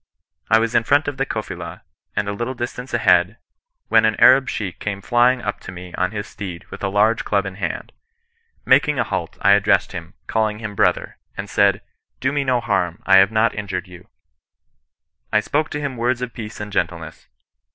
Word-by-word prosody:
I 110 Hz, -, +6 dB
was 115 Hz, +1 st, 0 dB
in 115 Hz, -, +3 dB
front 145 Hz, +6 st, +2 dB
of 145 Hz, -2 st, -3 dB
the 135 Hz, 0 st, -1 dB
Kofila, 90 Hz, -6 st, -6 dB, 0.3 s
and 105 Hz, 0 st, -1 dB
a 100 Hz, -, -2 dB
little 120 Hz, +5 st, -4 dB
distance 125 Hz, +1 st, -5 dB
ahead, 90 Hz, -3 st, +3 dB, 0.5 s
when -, -, +4 dB
an 110 Hz, 0 st, +2 dB
Arab 130 Hz, 0 st, +6 dB
Sheik 95 Hz, -5 st, -4 dB
came 100 Hz, -2 st, -3 dB
fiying 120 Hz, +4 st, +2 dB
up 100 Hz, -, -3 dB
to -, -, -9 dB
me 90 Hz, -1 st, -10 dB
on 90 Hz, 0 st, 0 dB
his 105 Hz, -1 st, -5 dB
steed 90 Hz, -7 st, -8 dB
with -, -, -9 dB
a -, -, +1 dB
large 105 Hz, +3 st, +2 dB
club 100 Hz, -1 st, 0 dB
in 95 Hz, -, -5 dB
his 95 Hz, -3 st, -2 dB
hand. -, -, -7 dB, 0.7 s
Making -, -, +4 dB
a -, -, +2 dB
halt, -, -, -4 dB
I 100 Hz, -, +6 dB
addressed 100 Hz, 0 st, +3 dB
him, 85 Hz, +1 st, -8 dB
calling 110 Hz, -1 st, 0 dB
him 110 Hz, -2 st, -6 dB
brother; -, -, 0 dB, 0.2 s
and 100 Hz, -, -5 dB
said, 100 Hz, +1 st, +2 dB, 0.2 s
' -, -, -52 dB
Do 130 Hz, -, 0 dB
me 145 Hz, -1 st, 0 dB
no 130 Hz, -2 st, +1 dB
harm, 90 Hz, -6 st, -1 dB
I 95 Hz, -1 st, +6 dB
have 95 Hz, +2 st, +5 dB
not 110 Hz, +1 st, +2 dB
injured 95 Hz, -3 st, -4 dB
you.' 90 Hz, -1 st, -14 dB, 0.6 s
" 80 Hz, +5 st, -53 dB
I 105 Hz, -, +4 dB
spoke 150 Hz, +7 st, -1 dB
to 150 Hz, -, -4 dB
him 140 Hz, -4 st, -4 dB
words 120 Hz, +1 st, 0 dB
of 120 Hz, -2 st, -5 dB
peace 110 Hz, -1 st, -8 dB
and 105 Hz, 0 st, -6 dB
gentleness. 85 Hz, -5 st, -3 dB
105 Hz, 210 wpm, -21 LUFS, 95-120 Hz, 0.7 s, I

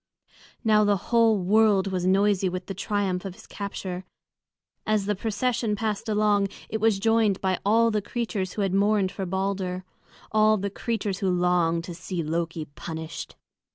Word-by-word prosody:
Now 215 Hz, -2 st, +4 dB
the 205 Hz, -1 st, +3 dB
whole 225 Hz, +2 st, +3 dB
world 200 Hz, 0 st, +3 dB
was 185 Hz, -1 st, -1 dB
noisy 195 Hz, 0 st, +3 dB
with 180 Hz, 0 st, -5 dB
the 195 Hz, -, -5 dB
triumph 195 Hz, -1 st, -1 dB
of 190 Hz, -2 st, -6 dB
his -, -, -15 dB
capture. 190 Hz, -2 st, -5 dB, 0.8 s
As 215 Hz, -2 st, +1 dB
the 210 Hz, -, +1 dB
procession 225 Hz, +1 st, -1 dB
passed 220 Hz, +1 st, -2 dB
along 210 Hz, -1 st, +3 dB, 0.2 s
it 220 Hz, 0 st, -3 dB
was 220 Hz, -2 st, +3 dB
joined 220 Hz, -1 st, +2 dB
by 190 Hz, -2 st, 0 dB
all 230 Hz, +3 st, +4 dB
the 210 Hz, -1 st, 0 dB
creatures 205 Hz, -4 st, -3 dB
who 210 Hz, -, -1 dB
had 195 Hz, -1 st, 0 dB
mourned 200 Hz, -1 st, +2 dB
for 195 Hz, -1 st, -4 dB
Balder, 190 Hz, -1 st, -2 dB, 0.5 s
all 215 Hz, 0 st, +4 dB
the 200 Hz, 0 st, -3 dB
creatures 205 Hz, -3 st, -2 dB
who 195 Hz, -3 st, 0 dB
longed 175 Hz, -2 st, +2 dB
to 175 Hz, -, -7 dB
see 175 Hz, 0 st, -4 dB
Loki 165 Hz, 0 st, -2 dB
punished. 160 Hz, +2 st, -7 dB
200 Hz, 165 wpm, -26 LUFS, 185-215 Hz, 0.8 s, Now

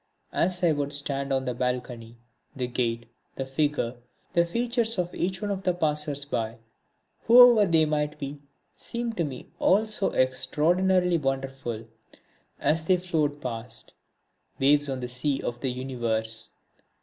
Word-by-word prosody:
As 180 Hz, +1 st, +1 dB
I 170 Hz, -, +5 dB
would 145 Hz, -1 st, -1 dB
stand 140 Hz, -1 st, 0 dB
on 130 Hz, 0 st, +1 dB
the 125 Hz, -, -1 dB
balcony, 125 Hz, -2 st, -3 dB, 0.4 s
the 130 Hz, -2 st, -2 dB
gait, 120 Hz, -1 st, -2 dB, 0.3 s
the 135 Hz, -, -3 dB
figure, 135 Hz, -3 st, -1 dB, 0.4 s
the 170 Hz, 0 st, +3 dB
features 235 Hz, +2 st, 0 dB
of 175 Hz, -1 st, -1 dB
each 185 Hz, +2 st, -2 dB
one 205 Hz, -, -1 dB
of 195 Hz, -1 st, -2 dB
the 180 Hz, -2 st, 0 dB
passers 150 Hz, -3 st, -1 dB
by, 115 Hz, -4 st, -3 dB, 0.7 s
whoever 235 Hz, -4 st, +8 dB
they 160 Hz, -1 st, +5 dB
might 150 Hz, 0 st, -1 dB
be, 140 Hz, 0 st, -6 dB, 0.4 s
seemed 235 Hz, -1 st, -4 dB
to 170 Hz, -, +2 dB
me 135 Hz, -5 st, -6 dB
all 205 Hz, +4 st, +4 dB
so 215 Hz, -2 st, 0 dB
extraordinarily 175 Hz, +7 st, +2 dB
wonderful, 135 Hz, -4 st, -3 dB, 0.7 s
as 160 Hz, +1 st, +1 dB
they 185 Hz, +3 st, +3 dB
flowed 155 Hz, -5 st, -1 dB
past, 115 Hz, -2 st, -6 dB, 0.6 s
waves 145 Hz, +1 st, +3 dB
on 130 Hz, -1 st, -3 dB
the 125 Hz, -, -3 dB
sea 130 Hz, +3 st, -1 dB
of 120 Hz, 0 st, -4 dB
the 130 Hz, -, -1 dB
universe. 115 Hz, -3 st, -2 dB
145 Hz, 150 wpm, -27 LUFS, 125-175 Hz, 0.7 s, whoever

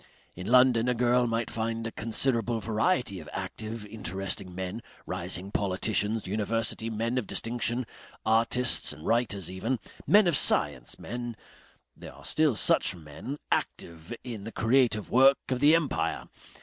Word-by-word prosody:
In 90 Hz, +2 st, -7 dB
London 125 Hz, -1 st, +5 dB
a 125 Hz, -, +1 dB
girl 125 Hz, +1 st, +3 dB
might 115 Hz, 0 st, -1 dB
find 115 Hz, 0 st, -2 dB
a 115 Hz, -, -3 dB
considerable 115 Hz, 0 st, 0 dB
variety 110 Hz, -, 0 dB
of 80 Hz, -, -10 dB
active, 110 Hz, 0 st, -5 dB
interesting 95 Hz, -2 st, -4 dB
men, 95 Hz, +4 st, -4 dB, 0.2 s
rising 90 Hz, +1 st, -4 dB
politicians, 105 Hz, +2 st, 0 dB
university 110 Hz, +3 st, -1 dB
men 115 Hz, +3 st, -1 dB
of 110 Hz, -, -6 dB
distinction, 120 Hz, +1 st, -1 dB, 0.4 s
artists 115 Hz, +3 st, +2 dB
and 75 Hz, +1 st, -12 dB
writers 100 Hz, -7 st, 0 dB
even, 110 Hz, +8 st, -1 dB, 0.3 s
men 210 Hz, 0 st, +6 dB
of 170 Hz, -3 st, +3 dB
science, 65 Hz, -, +2 dB
men 120 Hz, -1 st, -5 dB, 0.6 s
there -, -, -11 dB
are -, -, -14 dB
still 155 Hz, -5 st, +2 dB
such 95 Hz, -, +3 dB
men 80 Hz, -, -8 dB
active 80 Hz, 0 st, -3 dB
in 115 Hz, -5 st, -6 dB
the 115 Hz, -, -6 dB
creative 115 Hz, -2 st, +2 dB
work 135 Hz, +2 st, +6 dB
of 130 Hz, -2 st, 0 dB
the 150 Hz, +4 st, +6 dB
empire. 160 Hz, -5 st, -1 dB
115 Hz, 145 wpm, -28 LUFS, 100-125 Hz, 0.6 s, men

